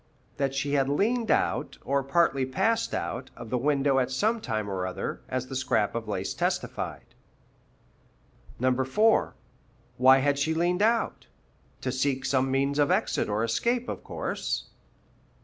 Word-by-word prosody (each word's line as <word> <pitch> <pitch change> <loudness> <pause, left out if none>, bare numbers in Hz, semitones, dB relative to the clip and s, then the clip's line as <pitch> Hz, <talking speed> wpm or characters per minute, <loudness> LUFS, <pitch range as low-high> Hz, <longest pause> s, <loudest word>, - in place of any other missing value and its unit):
That 135 -1 -1
she 140 +1 -1
had 135 -1 +2
leaned 225 +10 +1
out, - - +1
or 140 +1 +1
partly 135 -1 +2
passed 195 - 0
out, 130 - -4
of 115 -2 -10
the 125 - +1
window 140 0 +2
at 125 -1 0
some 215 - 0
time 110 - -2
or 95 -2 -2
other, 95 - -4
as 130 -1 -2
the 135 - -7
scrap 120 -5 +1
of 115 -1 -4
lace 95 -2 -2
testified. - - -3 1.5
4. 130 - +2 0.6
Why 130 +1 +7
had 140 +1 +1
she 160 +3 +1
leaned 175 +3 +1
out? 230 +2 +1 0.5
To 130 - -2
seek 130 +1 -1
some 135 -1 +1
means 140 +2 +1
of 145 - +3
exit - - +1
or 105 +2 0
escape, 235 - 0
of - - -5
course. - - -3
135 Hz, 150 wpm, -27 LUFS, 130-160 Hz, 1.5 s, Why